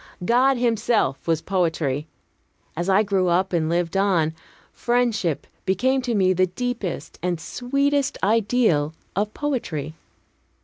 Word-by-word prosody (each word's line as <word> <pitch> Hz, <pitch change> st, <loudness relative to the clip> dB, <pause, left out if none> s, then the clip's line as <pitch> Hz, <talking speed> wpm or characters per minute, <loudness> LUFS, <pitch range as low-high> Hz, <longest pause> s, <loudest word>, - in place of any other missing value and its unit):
God 255 Hz, +5 st, +4 dB
himself 225 Hz, -, 0 dB
was 160 Hz, -1 st, +1 dB
poetry. 160 Hz, -6 st, -1 dB, 0.7 s
As 175 Hz, +4 st, -2 dB
I 195 Hz, +3 st, +4 dB
grew 195 Hz, -3 st, +1 dB
up 180 Hz, +2 st, +1 dB
and 160 Hz, -2 st, +1 dB
lived 170 Hz, +1 st, -1 dB
on, 185 Hz, -5 st, +2 dB, 0.4 s
friendship 235 Hz, -, 0 dB, 0.2 s
became 255 Hz, +8 st, +1 dB
to 245 Hz, -2 st, -2 dB
me 185 Hz, -2 st, +3 dB
the 185 Hz, +1 st, +2 dB
deepest 210 Hz, -, -4 dB
and 175 Hz, -1 st, -1 dB
sweetest 275 Hz, -, 0 dB
ideal 200 Hz, -8 st, +2 dB, 0.2 s
of 205 Hz, +2 st, 0 dB
poetry. 170 Hz, -, -3 dB
195 Hz, 125 wpm, -23 LUFS, 170-245 Hz, 0.7 s, God